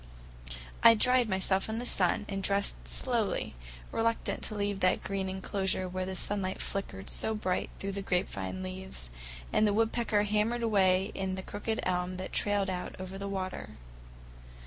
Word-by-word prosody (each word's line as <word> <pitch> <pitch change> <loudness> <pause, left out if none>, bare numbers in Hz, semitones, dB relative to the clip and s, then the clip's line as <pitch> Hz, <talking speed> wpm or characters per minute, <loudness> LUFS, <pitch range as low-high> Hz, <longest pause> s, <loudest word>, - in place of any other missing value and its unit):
I 230 0 +9
dried 250 +1 +4
myself 190 +1 +1
in 220 - -2
the 240 - -3
sun, 215 -3 +2
and 195 -1 -3
dressed 200 +1 +1
slowly, 235 -6 0 0.4
reluctant 230 0 0
to 215 - -5
leave 205 -1 -1
that 185 -1 +2
green 195 -1 -2
enclosure 190 0 -1
where 185 +1 -3
the 190 - -3
sunlight 190 0 0
flickered 195 0 -3
so 220 - +2
bright 185 -4 -1
through 195 - -3
the 200 0 -3
grapevine 180 - -1
leaves 185 - -6 0.4
and 215 - +5
the 205 - +2
woodpecker 225 -1 +2
hammered 215 +3 +1
away 195 -3 +3
in 190 -1 -2
the 190 - -5
crooked 220 +3 -3
elm 180 0 0
that 185 - -6
trailed 200 -2 +1
out 180 -1 -4
over 185 +1 -6
the 200 0 -3
water. 185 -1 -4
195 Hz, 165 wpm, -31 LUFS, 185-210 Hz, 0.4 s, I